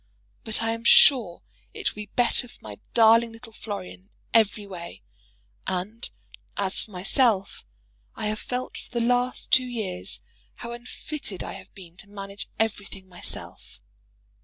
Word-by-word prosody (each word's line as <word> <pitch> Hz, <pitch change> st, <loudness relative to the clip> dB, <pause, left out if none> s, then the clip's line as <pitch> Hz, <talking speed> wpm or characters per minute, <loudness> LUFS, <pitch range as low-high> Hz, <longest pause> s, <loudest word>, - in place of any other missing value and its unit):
But 220 Hz, 0 st, 0 dB
I 225 Hz, -, +1 dB
am 230 Hz, 0 st, -4 dB
sure 235 Hz, -7 st, +6 dB, 0.3 s
it 425 Hz, -3 st, 0 dB
will 210 Hz, -, -7 dB
be -, -, -5 dB
better 245 Hz, +2 st, +3 dB
for -, -, -16 dB
my 105 Hz, -1 st, -8 dB, 0.2 s
darling 230 Hz, 0 st, +6 dB
little 225 Hz, 0 st, -11 dB
Florian 95 Hz, -, -6 dB
in -, -, -35 dB, 0.2 s
every 215 Hz, -2 st, +4 dB
way; 170 Hz, -, -8 dB, 0.6 s
and 195 Hz, +6 st, -3 dB, 0.5 s
as 195 Hz, -1 st, 0 dB
for -, -, -8 dB
myself, 195 Hz, -, +1 dB, 0.5 s
I -, -, -3 dB
have 215 Hz, 0 st, -1 dB
felt 250 Hz, 0 st, -4 dB
for -, -, -10 dB
the 235 Hz, -1 st, 0 dB
last 245 Hz, +1 st, +1 dB
two 255 Hz, -1 st, +6 dB
years 215 Hz, -7 st, -2 dB, 0.4 s
how 235 Hz, -, -7 dB
unfitted 240 Hz, -, -6 dB
I -, -, -5 dB
have -, -, -11 dB
been 180 Hz, -3 st, -12 dB
to 200 Hz, -, -9 dB
manage 200 Hz, 0 st, -6 dB
everything 200 Hz, -3 st, -2 dB
myself. 175 Hz, -1 st, -6 dB
215 Hz, 155 wpm, -26 LUFS, 190-235 Hz, 0.6 s, sure